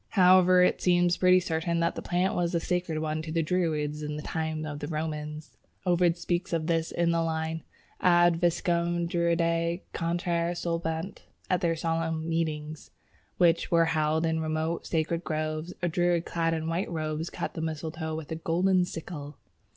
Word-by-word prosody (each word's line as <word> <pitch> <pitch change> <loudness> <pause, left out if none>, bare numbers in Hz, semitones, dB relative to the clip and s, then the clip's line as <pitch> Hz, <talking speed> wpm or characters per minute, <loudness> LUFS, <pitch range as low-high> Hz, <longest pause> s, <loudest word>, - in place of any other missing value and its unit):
However, 185 0 +6
it - - +2
seems 175 -1 +3
pretty 185 0 +5
certain 170 -1 -1
that 170 - +1
the - - -6
plant 180 +2 0
was 175 0 0
a - - +3
sacred 175 -1 -1
one 155 0 -2
to 155 0 -6
the 165 0 +1
Druids 155 -3 -1
in 150 0 -4
the 150 - -6
time 160 -1 -3
of 145 -1 -5
the 145 - -5
Romans. 155 -1 -5 0.3
Ovid 175 -1 +3
speaks 175 +1 -2
of 165 -2 0
this 165 -1 0
in 170 0 +1
the 165 0 +1
line, 160 0 -2 0.4
"Ad 175 -1 +4
Viscum 170 0 +1
Druidæ 170 0 +1
cantare 170 0 -1
solebant." 165 +1 -3 0.3
At 180 - +2
their 165 -1 +1
solemn 165 0 -1
meetings, 155 -2 -3 0.5
which 170 -2 +3
were 165 -1 +4
held 155 +1 +1
in 160 0 0
remote 160 +1 -2
sacred 165 +1 -1
groves, 155 +1 -3
a - - +3
Druid 175 0 +1
clad 165 -1 0
in 160 0 -3
white 170 +4 -1
robes 155 0 -3
cut - - -4
the 165 - -5
mistletoe 160 0 -4
with 160 -1 -7
a - - -1
golden 180 +3 +2
sickle. 155 -4 -7
165 Hz, 175 wpm, -28 LUFS, 160-175 Hz, 0.5 s, However